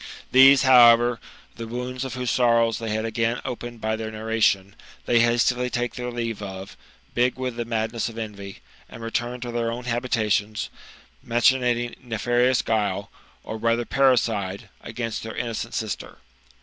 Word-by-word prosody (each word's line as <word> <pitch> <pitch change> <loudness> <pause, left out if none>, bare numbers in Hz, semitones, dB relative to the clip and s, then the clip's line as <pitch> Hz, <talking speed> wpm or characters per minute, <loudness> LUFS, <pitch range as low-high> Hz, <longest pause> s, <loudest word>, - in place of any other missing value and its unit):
These, 135 +1 +7
however, 120 -2 +6 0.4
the 115 -1 -6
wounds 125 +2 -4
of 130 -1 -5
whose 125 -2 -2
sorrows 115 -2 +2
they 115 -1 -4
had 110 +1 -1
again 115 +1 -1
opened 120 -2 -6
by 110 0 0
their 110 0 -5
narration, 110 -3 0 0.3
they 120 - +3
hastily 120 +1 +2
take 120 0 -2
their 125 -1 -5
leave 115 -3 -4
of, 95 0 -7 0.4
big 125 +1 +2
with 130 -2 -3
the 120 0 -3
madness 115 0 -2
of 115 - -12
envy, 100 -3 -7 0.3
and 115 - -10
return 120 +2 -3
to 120 -1 -5
their 115 -1 -1
own 120 +2 -5
habitations, 110 -4 -1 0.5
machinating 120 0 +1
nefarious 120 0 +1
guile, 100 -3 -1 0.3
or 110 - -6
rather 115 +1 0
parricide, 115 -8 +1
against 115 -1 -4
their 110 -1 -7
innocent 115 -1 -4
sister. 110 -2 -4
115 Hz, 150 wpm, -24 LUFS, 110-125 Hz, 0.5 s, These